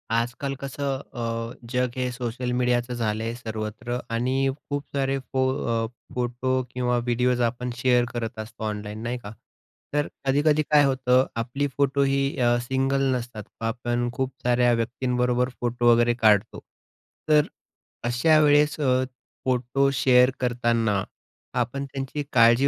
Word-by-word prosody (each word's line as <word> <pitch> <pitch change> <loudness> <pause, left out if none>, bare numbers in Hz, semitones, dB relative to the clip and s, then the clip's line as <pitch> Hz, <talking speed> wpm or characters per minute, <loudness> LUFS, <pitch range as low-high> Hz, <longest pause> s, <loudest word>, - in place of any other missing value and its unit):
आजकाल 120 +4 -1
कसं 135 0 -3
अ, 115 -2 -4 0.2
जग 125 -1 +1
हे 125 -1 -1
सोशल 125 0 -3
मीडियाचं 125 0 +1
झालं 110 -2 -1
आहे 115 - -2
सर्वत्र 115 +1 -4 0.2
आणि 125 +3 0 0.3
खूप 145 0 -2
सारे 135 0 +1
फो 130 0 -1 0.4
अ, - - -4 0.3
फोटो 125 +1 -1 0.2
किंवा 125 -1 0
व्हिडिओज 125 +1 +1
आपण 125 +1 -5
शेअर 125 0 +3
करत 115 -1 -4
असतो 110 +1 -7
ऑनलाईन 105 0 -4
नाही 120 +1 -2
का? 105 - -7 0.6
तर 145 0 +1 0.2
कधी-कधी 145 +3 +3
काय 150 0 +4
होतं, 130 -1 +3 0.2
आपली 135 +5 -2
फोटो 140 0 +2
ही 140 0 +2 0.2
अ, 120 -1 +3
सिंगल 135 +2 0
नसतात, 120 -3 -5 0.2
आपण 120 +1 -1
खूप 130 +1 -2
साऱ्या 120 0 +3
व्यक्तींबरोबर 125 +1 0
फोटो 120 0 +3
वगैरे 120 0 +4
काढतो. 105 -3 +4 0.7
तर 150 -1 +5 0.6
अशा 155 +6 +4
वेळेस 150 +1 +4
अ, 130 -3 +2 0.4
फोटो 130 +2 +2
शेअर 125 -1 +5
करताना, 115 -5 +1 0.6
आपण 130 +3 -2
त्यांची 135 +2 -4
काळजी 120 +2 +6
125 Hz, 140 wpm, -25 LUFS, 120-135 Hz, 0.7 s, काळजी